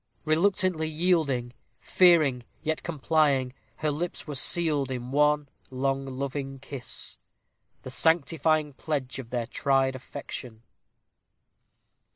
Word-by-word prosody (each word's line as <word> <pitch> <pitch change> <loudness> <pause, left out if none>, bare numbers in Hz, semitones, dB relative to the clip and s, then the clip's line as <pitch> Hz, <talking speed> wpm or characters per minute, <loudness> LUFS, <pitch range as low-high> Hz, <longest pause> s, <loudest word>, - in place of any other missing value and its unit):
Reluctantly 170 0 +2
yielding 155 -7 +1 0.2
fearing, 155 -9 +4 0.2
yet 160 0 -1
complying, 145 -5 +1 0.2
her 155 +3 -1
lips 165 +4 -4
were 150 - -5
sealed 145 -1 +2
in 125 -1 -5
one 150 +1 +3 0.2
long, 135 +1 -1
loving 135 +1 -4
kiss, 135 -1 -7 0.6
the 130 - -7
sanctifying 155 0 +2
pledge 135 -2 -3
of 120 -3 -8
their 120 -1 -2
tried 135 +1 +1
affection. 120 -3 -8
140 Hz, 105 wpm, -27 LUFS, 130-160 Hz, 0.6 s, fearing